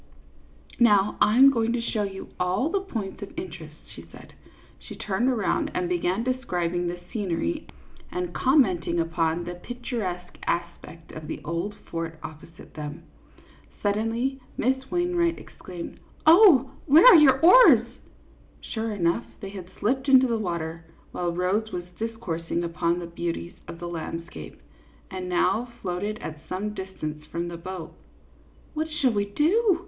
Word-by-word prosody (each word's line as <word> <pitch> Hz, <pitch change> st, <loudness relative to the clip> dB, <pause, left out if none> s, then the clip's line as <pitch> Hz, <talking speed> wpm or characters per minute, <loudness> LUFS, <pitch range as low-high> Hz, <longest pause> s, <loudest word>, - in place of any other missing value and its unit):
" -, -, -25 dB
Now 205 Hz, 0 st, +3 dB
I 210 Hz, +3 st, +4 dB
am 270 Hz, +1 st, +9 dB
going 230 Hz, -2 st, 0 dB
to 245 Hz, -, 0 dB
show 230 Hz, -2 st, -1 dB
you 195 Hz, -1 st, -5 dB
all 185 Hz, -, +1 dB
the 395 Hz, +3 st, +1 dB
points 220 Hz, -, -5 dB
of 200 Hz, -, -9 dB
interest," 160 Hz, -4 st, -7 dB
she -, -, -11 dB
said. -, -, -14 dB, 0.5 s
She -, -, -10 dB
turned 210 Hz, +6 st, 0 dB
around 225 Hz, -7 st, 0 dB
and 180 Hz, -, 0 dB
began 180 Hz, +4 st, 0 dB
describing 180 Hz, -9 st, -1 dB
the 175 Hz, 0 st, -4 dB
scenery 175 Hz, -, -2 dB, 0.4 s
and 180 Hz, -1 st, -3 dB
commenting 185 Hz, -, +2 dB
upon 165 Hz, 0 st, 0 dB
the 175 Hz, +1 st, -5 dB
picturesque 195 Hz, -4 st, -5 dB
aspect 170 Hz, -1 st, -4 dB
of 155 Hz, -1 st, -8 dB
the -, -, -5 dB
old 170 Hz, +6 st, -3 dB
fort 165 Hz, -4 st, -6 dB
opposite 160 Hz, +1 st, -11 dB
them. 150 Hz, 0 st, -7 dB, 0.8 s
Suddenly 225 Hz, +6 st, 0 dB, 0.2 s
Miss 265 Hz, +2 st, 0 dB
Wainwright 350 Hz, -1 st, +1 dB
exclaimed: 175 Hz, -2 st, -9 dB, 0.2 s
" -, -, -29 dB
Oh, 315 Hz, -, +7 dB, 0.2 s
where 310 Hz, +4 st, +7 dB
are -, -, +11 dB
your 265 Hz, -3 st, +6 dB
oars? 430 Hz, +10 st, +8 dB, 0.4 s
" -, -, -29 dB
Sure 225 Hz, 0 st, -2 dB
enough, 180 Hz, +2 st, 0 dB
they 195 Hz, -, -7 dB
had 190 Hz, -3 st, -9 dB
slipped 260 Hz, +6 st, 0 dB
into 260 Hz, -1 st, +7 dB
the 235 Hz, -2 st, 0 dB
water, 165 Hz, -4 st, -3 dB, 0.3 s
while 175 Hz, -1 st, -2 dB
Rose 190 Hz, +5 st, 0 dB
was 175 Hz, -, -4 dB, 0.2 s
discoursing 175 Hz, -7 st, -3 dB
upon 170 Hz, 0 st, 0 dB
the 175 Hz, -, -5 dB
beauties 170 Hz, 0 st, -4 dB
of -, -, -8 dB
the 175 Hz, -, -5 dB
landscape, 165 Hz, -, -7 dB, 0.5 s
and 185 Hz, -1 st, -5 dB
now 205 Hz, +7 st, +1 dB
floated 195 Hz, +3 st, -2 dB
at 155 Hz, -1 st, -6 dB
some 210 Hz, +3 st, -3 dB
distance 155 Hz, -6 st, -6 dB
from 170 Hz, +1 st, -4 dB
the 170 Hz, -, -6 dB
boat. 180 Hz, 0 st, -7 dB, 0.4 s
" -, -, -30 dB
What 315 Hz, 0 st, -2 dB
shall 275 Hz, -6 st, +1 dB
we 205 Hz, -1 st, +1 dB
do 340 Hz, -, +2 dB
190 Hz, 155 wpm, -26 LUFS, 170-245 Hz, 0.8 s, are